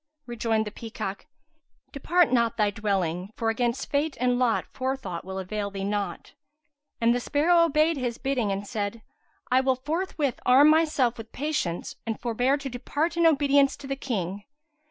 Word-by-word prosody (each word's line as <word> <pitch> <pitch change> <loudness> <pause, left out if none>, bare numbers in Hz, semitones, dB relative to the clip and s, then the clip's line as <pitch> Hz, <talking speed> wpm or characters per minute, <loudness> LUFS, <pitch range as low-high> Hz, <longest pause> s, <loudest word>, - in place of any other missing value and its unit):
Rejoined 225 -2 -1
the 210 - -5
peacock, 215 0 -6 0.6
"Depart 340 +3 +2
not 235 -2 +2
thy 210 -2 +2
dwelling, 190 -4 -1
for 225 -1 0
against 240 +3 -2
fate 290 +1 0
and 250 0 +2
lot 245 -3 +2
forethought 260 -10 -3
will 190 +1 -6
avail 200 +2 -3
the 195 -1 -5
naught." 205 0 -3 0.7
And 230 +1 +4
the 245 - 0
sparrow 335 +6 +3
obeyed 310 0 +2
his 245 -3 -2
bidding 255 -6 -1
and 195 +1 -3
said, 215 0 -4 0.5
"I 255 +1 +5
will 265 0 +2
forthwith 300 0 -2
arm 275 +4 +7
myself 300 -7 +2
with 225 0 -9
patience 275 - -3
and 225 - -2
forbear 245 +4 +1
to 280 -1 -6
depart 290 +6 -2
in 335 -1 +4
obedience 280 -2 +3
to 285 - -11
the 275 0 -2
King." 205 -7 -4
245 Hz, 165 wpm, -26 LUFS, 210-280 Hz, 0.7 s, arm